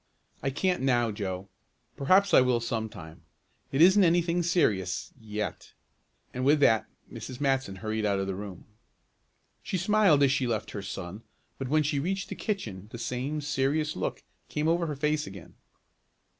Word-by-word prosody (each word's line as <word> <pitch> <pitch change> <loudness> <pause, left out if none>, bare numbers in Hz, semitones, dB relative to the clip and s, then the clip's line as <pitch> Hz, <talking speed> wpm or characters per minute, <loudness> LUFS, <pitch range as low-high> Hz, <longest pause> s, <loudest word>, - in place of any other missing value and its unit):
"I 135 - 0
can't 180 +5 0
now, 120 -4 +2
Joe. 95 -2 -4 0.5
Perhaps 185 +8 +3
I - - +8
will 125 -2 +2
some 115 -1 -2
time. 80 -4 -11 0.5
It 135 +4 +5
isn't 190 +3 +7
anything 175 0 +3
serious 105 - 0
yet," 105 -1 -5 0.6
and 125 - -3
with 145 +3 +4
that 110 -5 +4 0.3
Mrs. 130 -1 -7
Matson 135 -8 0
hurried 110 +2 -3
out 100 -2 +2
of 95 - -1
the 95 - -2
room. 95 -2 -8 1.0
She 185 - -2
smiled 185 -5 +4
as 135 - +5
she 135 -2 +1
left 110 -2 -2
her 100 - -5
son, 100 0 -6 0.4
but 135 - -3
when 155 +1 +3
she 145 -1 0
reached 195 +6 -2
the - - -5
kitchen 110 - -4
the - - -6
same 125 +5 -3
serious 145 +2 0
look - - -3 0.3
came 150 +1 -1
over 170 +1 +2
her 150 - -3
face 150 +2 0
again. 95 -3 -11
135 Hz, 170 wpm, -28 LUFS, 105-155 Hz, 1.0 s, I